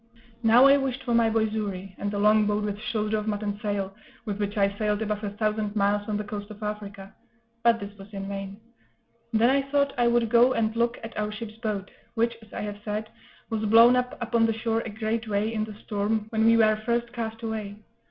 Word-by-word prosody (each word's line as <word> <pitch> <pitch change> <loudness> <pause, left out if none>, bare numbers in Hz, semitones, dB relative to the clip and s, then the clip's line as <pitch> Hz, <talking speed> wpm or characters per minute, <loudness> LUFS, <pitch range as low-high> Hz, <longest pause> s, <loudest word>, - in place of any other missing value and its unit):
Now 235 +3 +6
I 275 +1 +7
wished 270 -2 -2
for 240 - -1
my 230 -1 +4
boy 220 0 +2
Xury, 200 -3 -4
and 205 - -2
the 205 - -3
longboat 210 0 +3
with 205 -1 -3
shoulder 215 0 -1
of 210 - -6
mutton 205 -1 -2
sail, 200 -2 -2 0.3
with 210 -2 -3
which 205 0 -2
I 200 0 +2
sailed 210 0 0
above 210 0 -3
a 205 - -1
thousand 210 0 -2
miles 205 +1 +1
on 210 - 0
the 210 - -3
coast 205 0 -6
of 215 0 -10
Africa; 205 -1 -6 0.5
but 230 -1 +4
this 200 0 -8
was 195 +2 -12
in 195 -1 -5
vain. 195 0 -6 0.7
Then 230 +2 +4
I 275 +1 +3
thought 280 0 0
I 240 - +4
would 235 -1 +3
go 245 +2 +6
and 225 -1 0
look 235 +1 +1
at 225 - -8
our 210 0 -1
ship's 215 0 -7
boat, 210 -4 -3 0.2
which, 235 0 +1
as 220 - -17
I - - -5
have 205 0 -5
said, 215 +1 -3 0.4
was 220 -1 -1
blown 230 +3 +7
up 250 0 -1
upon 235 -1 +2
the 225 -1 -1
shore 225 0 0
a 230 - -6
great 220 +2 -2
way, 210 +2 0
in 215 -1 -1
the 215 -1 -9
storm, 210 +1 -1
when 220 0 +1
we 230 0 +6
were 215 -1 +3
first 235 +1 -1
cast 225 -1 -5
away. 215 -3 -4
215 Hz, 225 wpm, -26 LUFS, 205-230 Hz, 0.7 s, I